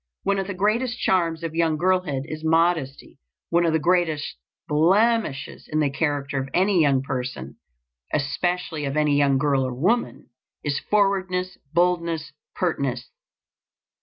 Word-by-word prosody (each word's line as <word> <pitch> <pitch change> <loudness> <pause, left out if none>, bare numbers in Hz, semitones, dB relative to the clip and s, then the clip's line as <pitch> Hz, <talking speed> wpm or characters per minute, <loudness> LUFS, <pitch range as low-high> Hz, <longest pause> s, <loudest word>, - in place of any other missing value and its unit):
One 200 0 +1
of 190 - -3
the 200 - -4
greatest 230 +6 0
charms 170 -5 +1
of 165 -1 -3
young 165 -2 +1
girlhood 180 -6 0
is 155 0 -7
modesty; 160 -4 0 0.3
one 170 0 +3
of 160 - +1
the - - +4
greatest 160 -2 0 0.3
blemishes 175 -1 +1
in 155 - +1
the 145 -3 +1
character 140 -1 -1
of 135 0 -4
any 190 -1 +3
young 135 -3 +3
person, 125 - -5 0.5
especially 155 +2 -1
of 140 +2 -2
any 150 -1 +3
young 140 -1 +3
girl 140 -1 +2
or 130 -1 -3
woman, 155 - 0 0.3
is 145 -1 -1
forwardness, 190 -3 +1
boldness, 170 -2 0 0.2
pertness. 140 -8 -2
160 Hz, 140 wpm, -24 LUFS, 140-180 Hz, 0.5 s, the